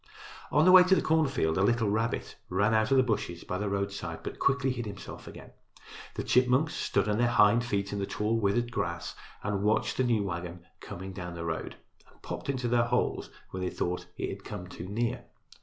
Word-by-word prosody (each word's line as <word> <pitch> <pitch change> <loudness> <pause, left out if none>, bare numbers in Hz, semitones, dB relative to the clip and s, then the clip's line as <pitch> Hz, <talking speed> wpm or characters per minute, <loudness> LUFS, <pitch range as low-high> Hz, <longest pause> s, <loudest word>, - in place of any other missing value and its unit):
On 150 +2 +4
the 185 - +7
way 185 0 +10
to 190 +1 +5
the 165 - +2
cornfield 135 - +2
a - - +3
little 120 +1 +2
rabbit 110 +3 -1
ran 100 +4 +2
out 110 +1 +3
of 135 - +4
the 130 - +6
bushes 105 -8 -2
by 90 - -3
the 105 0 -1
roadside, 100 0 -3
but - - -6
quickly 135 -1 +2
hid 120 -3 -4
himself 100 -2 -9
again. - - -11 0.6
The - - -3
chipmunks 125 +5 +3
stood - - 0
on 105 +1 +1
their 120 - +4
hind 115 0 +5
feet 100 -4 -2
in 100 - -2
the 100 - -2
tall, 110 +2 0
withered 120 +4 +1
grass - - -3 0.3
and 100 -1 -1
watched 105 +2 +1
the 130 - +3
new 115 -4 +2
wagon 85 -2 -5
coming 95 +2 -8
down 90 -2 -6
the 85 -1 -5
road 80 -1 -3 0.4
and - - -25
popped - - -6
into 130 -3 -1
their 120 0 +3
holes 120 - 0 0.2
when 95 - -5
they 90 - -1
thought 90 +1 -3
it - - -2
had - - -7
come 95 -4 -6
too 90 -1 -8
near. 115 +3 -2
105 Hz, 215 wpm, -29 LUFS, 95-120 Hz, 0.6 s, way